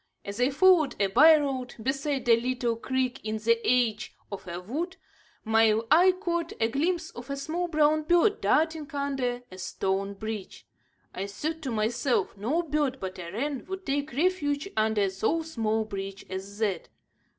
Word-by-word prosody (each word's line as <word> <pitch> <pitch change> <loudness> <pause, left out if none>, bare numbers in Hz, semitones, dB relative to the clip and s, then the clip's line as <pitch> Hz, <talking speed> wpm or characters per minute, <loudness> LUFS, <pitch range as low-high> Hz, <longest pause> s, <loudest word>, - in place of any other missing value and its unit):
As 200 +4 -5
I 250 - +4
followed 320 0 +4
a 200 -1 +2
byroad, 275 0 +4
beside 275 0 -1
a 230 - +7
little 245 -1 -1
creek 260 +2 -2
in 215 0 -2
the 230 +2 +2
edge 240 -4 +1 0.2
of 195 -2 -7
a 175 0 -5
wood, 315 - -4 0.5
my 220 0 +4
eye 355 +4 +7
caught 345 -3 -2
a 225 - +2
glimpse 330 +6 -1
of 245 +3 -10
a 280 - -3
small 325 +5 -2
brown 310 -1 +3
bird 350 +7 +3
darting 315 -1 +1
under 265 -3 -2
a 185 - -10
stone 195 +2 -2
bridge. 215 -1 -6 0.5
I 195 +2 -4
thought 315 +11 -4
to 275 - -4
myself 230 +4 0
no 255 - 0
bird 295 -4 0
but 185 -1 -6
a 170 -1 -6
wren 275 +6 -3
would 380 0 -6
take 285 +1 -1
refuge 300 0 0
under 215 -2 +2
so 220 +13 0
small 225 -8 -1
a - - -11
bridge 195 -1 -6
as 195 +2 -6
that. 205 -6 -1
255 Hz, 170 wpm, -27 LUFS, 215-310 Hz, 0.5 s, a